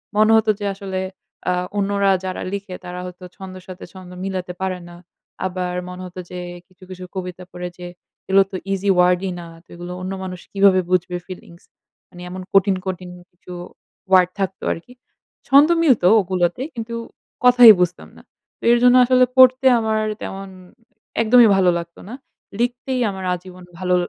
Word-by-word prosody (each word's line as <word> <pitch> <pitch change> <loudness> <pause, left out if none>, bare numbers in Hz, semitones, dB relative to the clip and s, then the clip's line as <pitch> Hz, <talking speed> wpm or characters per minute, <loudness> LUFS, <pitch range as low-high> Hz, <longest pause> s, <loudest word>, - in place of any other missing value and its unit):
মনে 215 +1 +4
হত 220 0 +2
যে 205 - -4
আসলে 195 -1 -5 0.5
আ - - +3 0.3
অন্যরা 200 0 +1
যারা 185 0 -4
লিখে 200 -2 -5
তারা 180 0 -7
হয়তো 180 0 -10
ছন্দের 185 -2 -10
সাথে 185 -1 -10
ছন্দ 185 -1 -12
মিলাতে 185 -2 -4
পারে 185 -1 -2
না। 175 - -12 0.5
আবার 180 -1 -3
মনে 180 0 -8
হত 180 0 -12
যে 180 - -6 0.3
কিছু 185 0 -21
কিছু 185 -1 -9
কবিতা 180 -1 -6
পড়ে 180 0 -6
যে 180 - -9 0.4
এগুলো 195 +1 +5
তো - - -6 0.2
ইজি 195 +1 -1
ওয়ার্ড 180 0 +4
ই 185 - -3
না। 170 - -8 0.2
তো - - -50
এগুলো 175 +1 -8
অন্য 185 - -5
মানুষ 185 -1 -6
কিভাবে 195 -1 +5
বুঝবে 180 0 0
ফিলিংস। 175 -2 -12 0.5
মানে 175 - -13
এমন 185 +1 -7
কঠিন 195 0 +4
কঠিন 185 -1 -5 0.2
কিছু 175 +1 -15 0.6
ওয়ার্ড 185 -1 +5
থাকতো 190 -1 -3
আরকি। 245 +9 -12 0.5
ছন্দ 280 +3 +6
মিলত 265 - +3 0.2
ওগুলোতেই 185 - -1
কিন্তু 230 0 -5 0.5
কথাই 245 -2 +9
বুঝতাম 180 0 -2
না। - - -14 0.4
তো - - -22
এর 240 - +5
জন্য 250 0 +6
আসলে 255 0 +4
পড়তে 260 +1 +6
আমার 220 -1 0 0.2
তেমন 195 0 -6 0.7
একদমই 230 +1 +6
ভালো 190 -2 +3
লাগত 170 0 -8
না। - - -7 0.5
লিখতেই 245 +2 -1
আমার 190 -1 -6
আজীবন 180 0 -9 0.2
ভালো 180 -1 +1
185 Hz, 170 wpm, -20 LUFS, 180-210 Hz, 0.7 s, কথাই